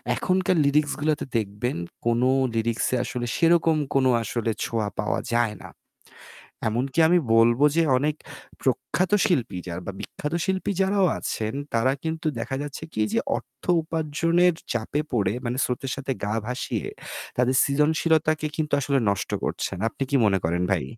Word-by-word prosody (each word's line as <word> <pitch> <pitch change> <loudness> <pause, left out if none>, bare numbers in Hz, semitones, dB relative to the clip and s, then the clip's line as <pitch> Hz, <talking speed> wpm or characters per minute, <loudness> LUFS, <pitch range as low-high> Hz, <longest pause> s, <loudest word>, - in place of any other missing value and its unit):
এখনকার 185 -1 +1
লিরিক্সগুলোতে 150 +1 +1
দেখবেন, 105 +1 -2 0.3
কোনো 120 +2 +3 0.3
লিরিক্স 115 0 0 0.2
আসলে 120 -1 -4
সেরকম 165 -1 +4 0.2
কোনো 130 -1 +4
আসলে 115 +1 -1
ছোঁয়া 110 -3 -1
পাওয়া 105 - 0
যায় 120 -3 +2
না। - - -9 1.0
এমনকি 130 +7 -1
আমি 180 +1 +5 0.2
বলবো 120 +4 +5
যে, 165 - +4
অনেক 150 +3 0 0.5
প্রখ্যাত 135 - 0
শিল্পী 120 - 0
যারা, 85 +1 -5
বা 100 - -4
বিখ্যাত 150 +2 -5
শিল্পী 190 +1 -1
যারাও 195 0 +3
আছেন, 110 0 -3 0.2
তারা 115 +3 +3
কিন্তু 160 0 -2
দেখা 125 +3 -3
যাচ্ছে 145 +1 -7
কি 110 - -1
যে - - +3 0.2
অর্থ - - -13 0.2
উপার্জনের 165 +3 +1 0.2
চাপে 120 +6 -1
পড়ে, 100 -5 +1
মানে 120 +2 -2
স্রোতের 130 +1 -2
সাথে 135 -1 -4
গা 105 - -1
ভাসিয়ে 125 +1 -3 0.5
তাদের 125 +1 +2
সৃজনশীলতাকে 155 +2 +2
কিন্তু 150 -2 -2
আসলে 140 0 +1
নষ্ট 100 - -1
করছেন। 95 - -2
আপনি 135 - -4
কী 140 - +2
মনে 95 -2 +3
করেন 85 +2 0
ভাই? 95 - +1
135 Hz, 150 wpm, -25 LUFS, 115-160 Hz, 1.0 s, আমি